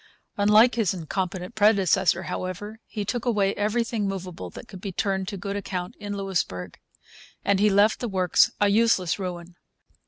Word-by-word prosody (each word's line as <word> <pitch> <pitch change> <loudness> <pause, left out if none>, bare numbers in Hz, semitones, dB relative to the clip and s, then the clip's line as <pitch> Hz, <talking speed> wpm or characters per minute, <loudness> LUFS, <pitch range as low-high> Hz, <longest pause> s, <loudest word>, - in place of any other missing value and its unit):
Unlike 210 +4 +5
his 220 -5 0
incompetent 185 +3 -4
predecessor, 195 -4 +3
however, 185 +6 -5
he 210 -2 -4
took 225 +3 -2
away 205 -5 +2
everything 215 0 -1
movable 185 -2 -5
that - - -11
could 190 -4 -11
be 195 - -4
turned 190 0 -1
to 200 - -4
good 200 +1 -4
account 190 0 -4
in 205 -1 -5
Louisbourg; 165 - -3 0.7
and 200 -1 +3
he 210 +1 +4
left 205 +2 +4
the 240 - -3
works 185 -3 +3
a 205 - +4
useless 205 -5 +2
ruin. 175 -2 -6
200 Hz, 160 wpm, -25 LUFS, 185-210 Hz, 0.7 s, Unlike